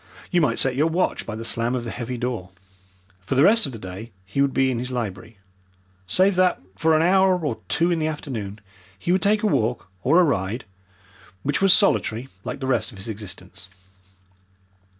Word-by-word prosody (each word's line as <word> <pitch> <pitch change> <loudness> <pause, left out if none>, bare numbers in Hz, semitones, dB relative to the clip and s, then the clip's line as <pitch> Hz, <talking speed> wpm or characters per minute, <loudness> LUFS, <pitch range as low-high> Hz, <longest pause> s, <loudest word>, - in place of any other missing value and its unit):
You 175 -2 +3
might 150 - +1
set 130 -1 +3
your 150 +4 +2
watch 170 +3 -1
by 110 - -4
the 115 +1 -6
slam 115 +2 0
of 125 - -3
the 115 - -5
heavy 120 +1 -5
door. 120 -7 -3 0.7
For 95 +8 -3
the 135 - +5
rest 225 -1 +5
of - - -6
the 115 - -7
day 100 +3 -8
he 105 +9 -1
would 140 -1 +2
be 135 0 +2
in 120 - -2
his 125 +1 -4
library 115 -3 -5 0.7
save 190 - +3
that 185 -1 +3 0.2
for 160 +8 +2
an 155 - +3
hour 190 +1 +4
or - - -2
two 165 +4 +1
in 170 - +1
the 155 - 0
afternoon 115 -10 -5 0.4
he 170 - -2
would 185 0 +2
take 210 +2 +2
a - - +2
walk 120 - 0
or 155 - +4
a - - +6
ride, 115 - -1 0.8
which 145 +4 -1
was 195 -1 +6
solitary 135 - +3
like - - -5
the 135 - -4
rest 120 -3 0
of 105 - -13
his 95 +4 -8
existence. 105 -3 -8
130 Hz, 205 wpm, -23 LUFS, 110-165 Hz, 0.8 s, a